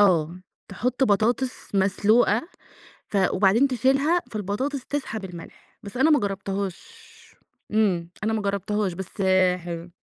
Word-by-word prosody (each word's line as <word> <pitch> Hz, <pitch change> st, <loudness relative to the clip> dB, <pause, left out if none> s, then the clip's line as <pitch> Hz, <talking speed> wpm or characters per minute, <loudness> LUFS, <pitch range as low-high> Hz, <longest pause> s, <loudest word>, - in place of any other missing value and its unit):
آه، 175 Hz, -3 st, +3 dB, 0.3 s
تحط 250 Hz, +7 st, 0 dB
بطاطس 230 Hz, +3 st, 0 dB
مسلوقة 210 Hz, -, +3 dB, 0.6 s
ف -, -, -3 dB, 0.2 s
وبعدين 205 Hz, +8 st, +4 dB
تشيلها 270 Hz, +7 st, +2 dB
فالبطاطس 225 Hz, +7 st, -3 dB
تسحب 250 Hz, -8 st, -4 dB
الملح، 175 Hz, -3 st, -11 dB
بس 200 Hz, +4 st, -9 dB
أنا 310 Hz, +5 st, +4 dB
ما 300 Hz, -, +5 dB
جرّبتهاش، 195 Hz, -1 st, -3 dB, 0.9 s
إمم، 185 Hz, -6 st, +1 dB
أنا 220 Hz, -, +1 dB
ما 220 Hz, -1 st, -1 dB
جرّبتهاش 200 Hz, 0 st, -1 dB
بس 190 Hz, +2 st, -6 dB, 0.3 s
حلو. 170 Hz, 0 st, -7 dB
205 Hz, 120 wpm, -24 LUFS, 190-250 Hz, 0.9 s, ما